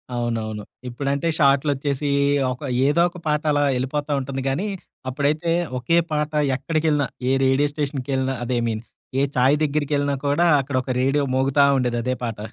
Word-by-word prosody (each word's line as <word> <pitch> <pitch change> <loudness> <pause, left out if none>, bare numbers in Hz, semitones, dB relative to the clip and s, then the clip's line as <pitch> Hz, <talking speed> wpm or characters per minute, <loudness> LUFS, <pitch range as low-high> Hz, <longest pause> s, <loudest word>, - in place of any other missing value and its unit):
అవునవును. 110 -3 -2 0.3
ఇప్పుడంటే 140 +5 -2
షార్టులొచ్చేసి 140 0 +2 0.4
ఒక, 125 - -7 0.3
ఏదో 160 +4 +3
ఒక 175 - -12
పాట 150 0 +1
అలా 145 0 +2
యెళ్లిపోతా 145 +4 -2
ఉంటుంది 135 0 -4
గానీ 175 +11 -1 0.4
అప్పుడైతే 150 +5 0 0.3
ఒకే 165 +8 +2
పాట. 150 0 -1 0.2
ఎక్కడికెళ్లినా, 150 +1 0 0.2
ఏ - - +3
రేడియో 140 +2 +3
స్టేషన్‌కెళ్లిన 135 -2 -2
అదే. 125 0 -1
ఐ - - -2
మీన్, 110 0 -3 0.4
ఏ - - +3 0.2
చాయి 130 +4 +4
దగ్గరికెళ్లినా 145 -1 0
కూడా, 165 +5 +3
అక్కడొక 130 -1 -2
రేడియో 140 +2 +2
మోగుతా 135 +2 +3
ఉండేది. 125 -2 0
అదే 130 - 0
పాట. 115 -3 -4
140 Hz, 150 wpm, -22 LUFS, 130-150 Hz, 0.4 s, చాయి